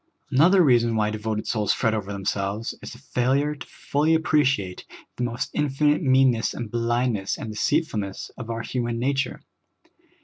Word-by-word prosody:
Another 175 +8 +5
reason 120 -5 +3
why 105 -1 +1
devoted 110 0 -3
souls 105 -3 +1
fret 110 - +1
over 100 -2 -3
them 100 -1 -6
selves 100 +3 -2
is - - -8
the - - -11
failure 135 +3 0
to 145 - -10
f - - -20
ull}^ 155 +3 +4
appreciate 135 - +1 0.3
the 125 - -2
most 120 -1 -3
infinite 150 +1 +1
meanness 130 -5 +3
and 115 -4 -6
blindness 120 -3 0
and 110 - -6
deceitfulness 105 - -1
of 115 -2 -8
our 115 0 -3
hu 125 - -2
man 120 -1 -2
nature. 135 +2 -1
120 Hz, 170 wpm, -24 LUFS, 110-140 Hz, 0.3 s, Another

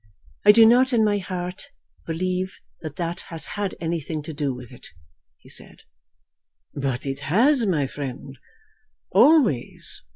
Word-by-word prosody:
"I 210 - +10
do 225 +1 +7
not 250 +3 +5
in 225 -2 +4
my 205 -1 +2
heart 180 +5 -6 0.4
believe 185 +3 -2 0.2
that 155 -3 -7
that 170 +1 -3
has 165 -2 -6
had 205 -2 -3
anything 160 -2 -3
to 160 - -7
do 145 -2 -1
with 125 0 -9
it," 125 - -13 0.5
he - - -21
said. - - -8 0.9
"But 135 -3 -3
it 135 0 -3
has, 225 - +3
my 155 -7 +1
friend, 135 0 -7 0.7
always. 265 - +3
170 Hz, 140 wpm, -24 LUFS, 140-205 Hz, 0.9 s, I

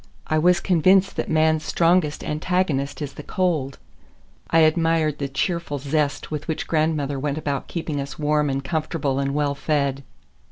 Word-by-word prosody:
I 155 - +1
was 180 +2 +4
convinced 185 +2 +3
that - - -2
man's 155 0 +2
strongest 165 -3 +2
antagonist 155 -3 -1
is 145 - -6
the - - -8
cold. 160 -8 -1 0.7
I 165 - +4
admired 160 -1 +2
the 140 - -1
cheerful 145 +2 -2
zest 145 +1 -1
with 150 -1 -4
which 160 - -2
grandmother 155 -3 0
went 145 +1 -2
about 145 -3 -3
keeping 155 -4 -3
us 140 0 -7
warm 150 -1 +1
and 135 0 -2
comfortable 155 -3 -1
and 140 0 -1
well 145 -1 +1
fed. 140 -2 -1
155 Hz, 160 wpm, -23 LUFS, 140-165 Hz, 0.7 s, was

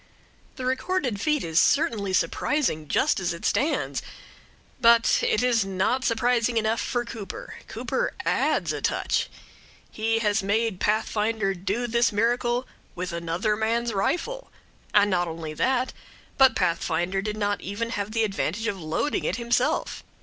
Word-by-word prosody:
The 255 - -5
recorded 260 - -1
feat 300 -2 +1
is 165 0 +2
certainly 230 - +2
surprising 180 - 0
just - - +2
as 180 -2 -1
it 170 - -8
stands; 305 +4 0 0.8
but 235 -1 +5
it 225 - +1
is 240 -4 +3
not 195 +7 0
surprising 240 0 +1
enough 220 +1 +1
for 240 -1 -1
Cooper. 235 - -8
Cooper - - -2
adds - - +1
a - - -4
touch. - - 0 0.6
He 225 +1 0
has 215 -1 +1
made 205 0 0
Pathfinder 215 -1 0
do 195 +6 -2
this 235 0 +2
miracle 240 +3 +1 0.3
with 180 -1 -4
another 170 +5 -1
man's 230 +2 0
rifle; 355 - -1 0.4
and 205 -1 +4
not 175 -1 +1
only 160 -1 -5
that, 255 - 0 0.4
but 265 -1 +6
Pathfinder 175 +3 0
did 210 +1 -4
not 205 -1 -1
have - - -9
even 230 +4 -3 0.2
the 225 +1 0
advantage 205 0 -2
of 200 -5 -2
loading 160 - -1
it - - 0
himself. 235 +1 0
220 Hz, 145 wpm, -25 LUFS, 195-240 Hz, 0.8 s, but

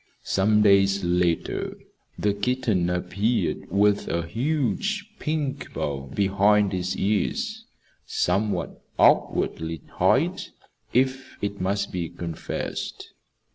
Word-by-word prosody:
Some 105 +2 +3
days 100 -1 +4
later 90 -1 0 0.4
the 105 -1 +1
kitten 100 -4 0
appeared 100 +6 -1
with 100 +2 +2
a 85 0 -1
huge 155 - -1
pink 150 -3 -2
bow 70 -1 -3
behind 100 0 +3
its 90 0 -1
ears, 220 - -1 0.4
somewhat 105 +1 -1 0.2
awkwardly 80 -2 +2 0.2
tied, - - +3 0.5
if 130 +1 0
it 100 -1 -3
must 100 +2 -1
be 85 -3 -3
confessed. 85 -2 -5
100 Hz, 95 wpm, -25 LUFS, 90-125 Hz, 0.5 s, days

